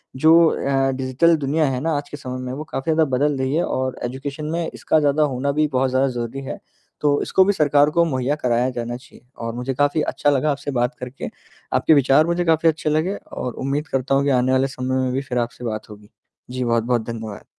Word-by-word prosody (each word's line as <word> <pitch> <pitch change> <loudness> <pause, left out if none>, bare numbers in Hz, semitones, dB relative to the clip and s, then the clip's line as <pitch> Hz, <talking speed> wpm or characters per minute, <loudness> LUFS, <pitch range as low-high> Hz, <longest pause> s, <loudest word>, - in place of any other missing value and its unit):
जो 160 +5 +6
अ, 135 -1 0
डिजिटल 135 +6 +2
दुनिया 150 +2 +1
है 125 - -2
ना 165 - 0
आज 145 0 -6
के 145 - -7
समय 130 -2 -6
में, 130 0 -5
वो 150 - -5
काफ़ी 155 0 -3
ज़्यादा 160 0 +3
बदल 145 0 +1
रही 130 +2 0
है 170 - +2
और 130 0 -2
एजुकेशन 140 +4 -5
में 170 0 -1
इसका 155 - +1
ज़्यादा 150 +1 +2
होना 140 0 0
भी 150 +1 +1
बहुत 130 +1 +2
ज़्यादा 130 +1 +2
ज़रूरी 120 +1 -4
है। - - -6 0.4
तो 145 -1 +2
इसको 190 - +3
भी 205 - +3
सरकार 145 -2 +3
को 170 +2 +3
मुहैया 135 -2 -1
कराया 125 +1 +2
जाना 120 -1 -4
चाहिए 125 0 -19 0.2
और 115 - -3
मुझे 125 +2 -3
काफ़ी 145 +3 +1
अच्छा 145 - 0
लगा 145 +2 +2
आपसे 145 +1 -4
बात 125 -1 0
करके। 125 +1 -6 0.4
आपके - - +4
विचार 140 +1 +4
मुझे 175 +1 0
काफ़ी 165 0 +4
अच्छे 155 -1 -1
लगे 160 +6 0 0.2
और 125 - -4
उम्मीद 145 +3 -1
करता 135 +1 0
हूँ 140 - +2
कि 140 - +1
आने 130 +1 +1
वाले 130 +1 +3
समय 130 0 -2
में 130 - -1
भी 135 - 0
फिर 125 -3 -4
आपसे 120 +1 -4
बात 110 -1 -4
होगी। 105 0 -13 0.4
जी, 130 0 -2
बहुत-बहुत 115 0 +1
धन्यवाद। 110 -3 -7
135 Hz, 230 wpm, -21 LUFS, 125-150 Hz, 0.4 s, जो